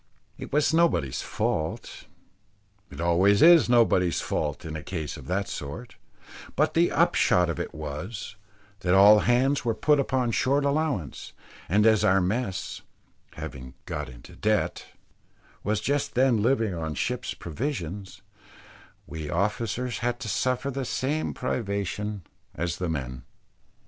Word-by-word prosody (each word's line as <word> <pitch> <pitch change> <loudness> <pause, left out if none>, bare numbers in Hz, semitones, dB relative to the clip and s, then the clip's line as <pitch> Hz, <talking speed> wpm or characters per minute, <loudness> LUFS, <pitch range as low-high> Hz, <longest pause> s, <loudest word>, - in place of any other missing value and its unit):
It - - -9
was 150 +2 +2
nobody's 160 - +2
fault 80 0 -3 0.8
it 70 - -11
always 90 +4 +4
is 170 -5 +7
nobody's 110 -7 +3
fault 75 -3 -3
in 80 -1 -5
a 80 - -5
case 80 -5 -5
of - - -11
that 100 +2 -1
sort 75 +13 -7 0.6
but 155 +3 +2
the 170 +1 +3
upshot 90 -1 +3
of - - -6
it - - -4
was, 90 +9 -6 0.4
that 90 0 +2
all 105 +2 +8
hands 130 +5 +2
were 115 -2 0
put 150 -1 +3
upon 130 -3 0
short 140 +5 +1
allowance; 140 - -2 0.4
and 105 +5 +3
as 110 -2 +5
our 95 -2 +4
mess 95 +1 -2 0.5
having 65 0 -8
got 75 -3 -4
into - - -13
debt 105 0 0 0.8
was 105 0 0
just 140 +6 -1
then 125 -3 +3
living 115 -3 +1
on 80 -3 -4
ship's - - -2
provisions, 100 - -5 0.8
we 80 -2 -6
officers 110 +6 -1
had 120 +1 -1
to - - -5
suffer 130 +5 0
the 135 0 -3
same 145 +5 -1
privations 105 -4 -3 0.3
as 85 0 -2
the 90 -2 -2
men. 65 -5 -4
105 Hz, 140 wpm, -26 LUFS, 85-125 Hz, 0.8 s, all